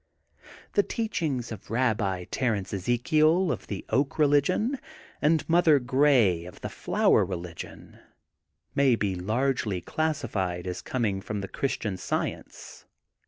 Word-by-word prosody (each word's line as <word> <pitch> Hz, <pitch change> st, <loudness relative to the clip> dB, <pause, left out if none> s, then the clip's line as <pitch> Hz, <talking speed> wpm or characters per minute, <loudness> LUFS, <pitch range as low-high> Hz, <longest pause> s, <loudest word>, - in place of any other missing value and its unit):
'*The 205 Hz, -, +5 dB
teachings 160 Hz, -, -2 dB
of 110 Hz, -4 st, -9 dB
Rabbi 105 Hz, -6 st, 0 dB, 0.2 s
Ezekiel 120 Hz, -, +2 dB
of -, -, -5 dB
the 100 Hz, -, -5 dB
Oak 135 Hz, +1 st, +1 dB
Religion 155 Hz, -, +2 dB, 0.4 s
and 155 Hz, +1 st, +2 dB
Mother 165 Hz, -3 st, +5 dB
Grey 125 Hz, -, +3 dB
of 90 Hz, -, -11 dB
the -, -, -4 dB
Flower -, -, +2 dB
Religion 85 Hz, -2 st, -7 dB, 0.7 s
may 135 Hz, -3 st, +4 dB
be 100 Hz, -4 st, -1 dB
largely 110 Hz, +1 st, -1 dB
classified 100 Hz, -, -2 dB
as 90 Hz, 0 st, -4 dB
coming 105 Hz, -7 st, -1 dB
from 100 Hz, 0 st, -4 dB
Christian 105 Hz, -8 st, -2 dB
Science. -, -, -5 dB
120 Hz, 115 wpm, -27 LUFS, 95-150 Hz, 0.7 s, The